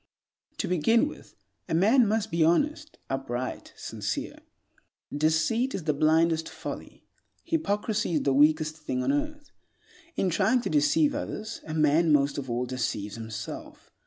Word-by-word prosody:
To - - -2
begin 225 - +3
with, 300 - -12 0.3
a - - +1
man 220 +7 +5
must 220 +1 0
be 165 -1 +2
honest, 295 - +1
upright, 130 -2 -4
sincere. - - -4 0.8
Deceit 160 - +1
is 180 - -4
the 155 -1 +1
blindest 160 +2 +2
folly. - - -8 0.4
Hypocrisy 215 - -1
is 150 - +1
the 135 - +2
weakest 155 +2 +3
thing 130 -5 -3
on - - +1
earth. 295 0 -3 0.6
In 185 - 0
trying 215 +8 +2
to - - -3
deceive 300 0 +3
others, 220 -6 -5
a 155 - -4
man 155 +1 +3
most 140 -1 +3
of 135 -2 -7
all 120 +1 -1
deceives 120 -5 -3
himself. 110 -2 -8
160 Hz, 145 wpm, -27 LUFS, 145-230 Hz, 0.8 s, man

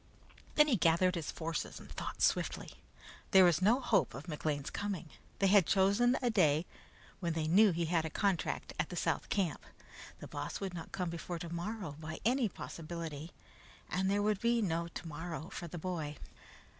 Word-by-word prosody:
Then 300 0 +7
he 255 -7 +3
gathered 170 +2 +4
his 170 -4 -3
forces 165 0 -4
and - - -12
thought - - -4
swiftly. - - +1 0.6
There 190 -1 +8
was 170 -2 +4
no 220 +7 +5
hope 215 -7 +2
of 140 +6 -8
McLean's 150 -2 -2
coming. 190 -6 -3 0.3
They 195 - +2
had 195 -3 +6
chosen 200 +6 +4
a 245 - +3
day 155 -4 +3 0.5
when 170 -3 -1
they 160 -1 -1
knew 205 +6 +6
he 170 -1 0
had 165 0 +1
a - - -2
big - - -25
contract 195 -4 0
at - - 0
the - - -6
South - - -1
camp. 190 -6 0 0.5
The - - -9
Boss 145 0 -4
could 195 -2 -4
not 165 -2 -7
come 180 -3 -2
before 170 +1 -5
tomorrow 170 0 -5
by 155 0 -6
any 245 -1 +3
possibility, 165 -2 -6 0.6
and 190 +1 +1
there 205 +1 +2
would 210 -2 +1
be 235 0 +3
no 170 -5 0
tomorrow 165 0 -6
for 175 - -5
the 175 - -7
boy. 155 -4 -4
175 Hz, 180 wpm, -34 LUFS, 160-200 Hz, 0.6 s, There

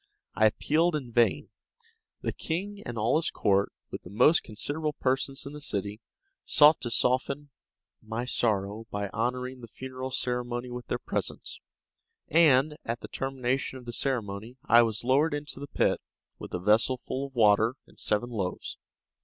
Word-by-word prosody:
I 110 - +5
appealed 160 +9 +2
in 130 -5 -4
vain. 120 0 +2 0.7
The - - -2
king 200 +5 -4
and 120 - -5
all 110 +7 +2
his 165 - 0
court, 100 0 +2 0.2
with - - -5
the - - -12
most 125 - +5
considerable 150 +8 -3
persons 135 0 -1
in 140 - -7
the 150 - -8
city, 105 -3 -3 0.4
sought 150 +1 +6
to 120 - -3
soften 135 +4 0 0.5
my 115 +2 -4
sorrow 110 -2 0
by 100 -1 -3
honoring 125 +4 -2
the 115 - -9
funeral 130 +2 -6
ceremony 125 -1 -2
with 125 0 -7
their - - -1
presence; - - -4 0.7
and, 150 -2 +5
at 115 +1 -3
the - - -8
termination 135 0 -2
of 125 - -12
the 120 - -6
ceremony, 115 -2 -2
I 120 - +7
was 110 -2 0
lowered 145 +5 +3
into 145 -2 -5
the 145 - -6
pit, - - +1 0.4
with - - -8
a - - -2
vessel 110 +7 +3
full 135 +2 -4
of 135 - -21
water 110 +1 +4
and - - -20
seven 115 +3 0
loaves. 95 -6 -3
125 Hz, 165 wpm, -28 LUFS, 110-140 Hz, 0.7 s, I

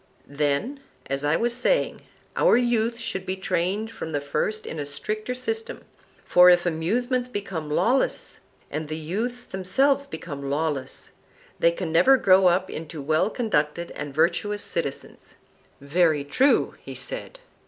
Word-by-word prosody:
Then, 145 - -1 0.3
as 135 +1 -3
I 145 +2 +2
was 235 +4 +1
saying, 380 - +1 0.3
our - - +5
youth 235 -1 +1
should 190 -5 -3
be 185 - -3
trained 190 +4 -1
from 160 -7 -7
the 145 - +1
first 215 +10 -2
in 160 - -6
a 145 - -3
stricter 215 - -4
system, 450 - -4 0.4
for 180 0 +7
if 175 0 +5
amusements 240 +10 0
become 185 -9 -5
lawless, 240 - 0 0.3
and 155 0 -3
the 155 +1 -4
youths 220 +10 -3
themselves 270 +10 +1
become 145 - -6
lawless, 145 -2 -3 0.5
they 170 - +4
can 170 -1 -4
never 265 +12 +6
grow 190 -4 +5
up 180 +2 +2
into 160 -2 -7
well 155 +7 +1
conducted 170 - -1
and 145 0 -6
virtuous 185 +7 +1
citizens. 140 -5 -5 0.4
Very 155 +1 +2
true, 260 - +2
he - - -9
said. - - -4
180 Hz, 145 wpm, -25 LUFS, 155-235 Hz, 0.5 s, for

